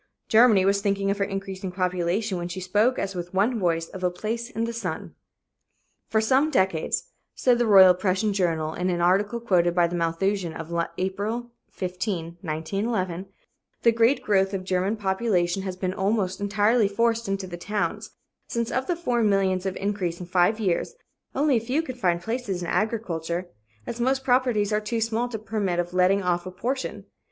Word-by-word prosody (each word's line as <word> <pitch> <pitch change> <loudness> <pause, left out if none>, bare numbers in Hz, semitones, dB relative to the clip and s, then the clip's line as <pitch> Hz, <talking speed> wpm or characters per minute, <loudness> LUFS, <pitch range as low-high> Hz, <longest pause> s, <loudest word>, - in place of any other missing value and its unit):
Germany 220 -4 +6
was 200 +1 +2
thinking 200 -1 0
of 200 - -3
her - - +2
increasing 195 -1 -4
population 180 +2 -1
when 175 - -3
she 180 +2 -5
spoke 210 +7 +2
as 195 0 -2
with 175 0 -6
one 220 +5 +2
voice 165 -3 0
of 190 -1 -8
a 180 - +3
"place 225 +6 -4
in 225 - -3
the 230 0 -2
sun." 180 -9 -5 1.0
"For 220 - +2
some 260 +7 +3
decades," 190 - 0 0.2
said 245 -2 +3
the 240 - +2
Royal 190 -3 +8
Prussian 190 +3 0
Journal, 165 -5 0
in 180 +1 -1
an 175 -1 0
article 200 +6 +2
quoted 175 -6 +2
by 175 -1 +4
the 170 +1 -3
Malthusian 170 +1 0
(London) 165 +1 -6
of 170 - 0
April 210 +6 -3 0.2
15, 180 -2 -4
1911, 185 +3 -2 0.6
"the 235 - +6
great 230 +4 +3
growth 195 -1 +2
of 185 - -4
German 185 +3 0
population 190 -2 0
has 190 -1 -4
been 185 0 -2
almost 195 -1 0
entirely 205 +2 +3
forced 230 +2 0
into 195 -1 -2
the 180 -2 -7
towns, 205 +4 -3 0.4
since 235 0 -2
of 260 +1 -1
the 350 - +1
four 250 -9 0
millions 195 -3 +2
of 190 - -3
increase 195 -4 -2
in 180 - -6
five 180 +5 +2
years, 200 - -1 0.4
only 280 -2 +3
a - - -1
few 260 +8 0
can 260 - -5
find 175 -8 0
places 220 -6 -3
in - - -4
agriculture, 180 -4 -2 0.4
as 235 - -5
most 265 +2 +1
properties 245 -5 +2
are 210 - +2
too 230 +2 -2
small 225 +2 0
to 230 - -4
permit 210 -4 -2
of 175 0 -2
letting 185 +2 +3
off 175 0 0
a - - -6
portion. 255 +8 -3
195 Hz, 185 wpm, -25 LUFS, 180-225 Hz, 1.0 s, Royal